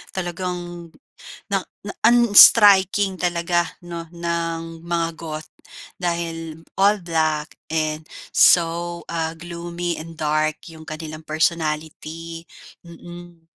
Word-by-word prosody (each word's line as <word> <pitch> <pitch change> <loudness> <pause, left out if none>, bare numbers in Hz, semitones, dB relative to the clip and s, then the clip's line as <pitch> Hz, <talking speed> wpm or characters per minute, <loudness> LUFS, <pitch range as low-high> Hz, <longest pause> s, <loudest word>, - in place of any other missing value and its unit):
talagang 180 0 -3 0.9
na 195 - +2 0.2
na 205 - -5 0.2
unstriking 205 -4 +6
talaga 175 -1 0 0.2
'no, 170 -1 -7
ng 165 -1 -3
mga 170 0 -1
goth 155 -1 -7 0.5
dahil 165 -2 -4 0.2
all 200 -1 +3
black 160 -2 0 0.2
and 155 0 -2 0.2
so, 170 0 +3
ah, 165 -1 -2
gloomy 170 0 -5
and 165 +1 -9
dark 155 0 -1
yung 160 0 -13
kanilang 155 0 -8
personality, 160 +1 -2 0.4
mm. 175 0 -12
170 Hz, 95 wpm, -22 LUFS, 160-175 Hz, 0.9 s, unstriking